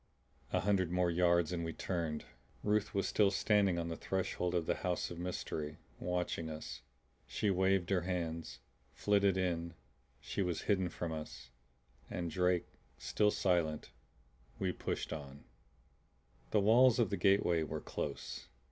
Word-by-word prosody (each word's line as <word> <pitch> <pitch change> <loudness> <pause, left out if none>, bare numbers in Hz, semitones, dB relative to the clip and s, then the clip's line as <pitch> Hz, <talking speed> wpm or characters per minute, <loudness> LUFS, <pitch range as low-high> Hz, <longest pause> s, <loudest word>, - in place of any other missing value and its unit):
A - - +2
hundred 95 -3 +2
more 90 0 +2
yards 85 -1 +3
and 85 -1 -2
we 80 0 -3
turned. 85 -4 -2 0.4
Ruth 105 0 +1
was 100 - +1
still 105 -2 +4
standing 100 -2 +3
on 85 0 -2
the 80 - -3
threshold 90 -1 -1
of 85 -2 +1
the - - 0
house 90 -1 -1
of 85 - -6
mystery, 80 -4 -4 0.2
watching 90 -2 -2
us. 80 0 -6 0.5
She 105 - 0
waved 95 -1 +2
her 95 -2 +3
hands, 85 -2 -3 0.3
flitted 100 -2 +3
in, 85 -2 -1 0.6
was 90 -4 0
hidden 95 -4 +2
from 85 -1 -4
us. 75 -5 -7 0.6
And 85 -2 -3
Drake 90 +1 +2 0.3
still 105 -1 +2
silent, 85 -6 0 0.7
we 95 -1 0
pushed - - -3
on. 70 -2 -8 1.1
The 105 - +3
walls 120 +4 +6
of 115 -4 +2
the - - +2
gateway 90 -3 +3
were 80 - -3
close. - - -5
90 Hz, 145 wpm, -35 LUFS, 85-95 Hz, 1.1 s, walls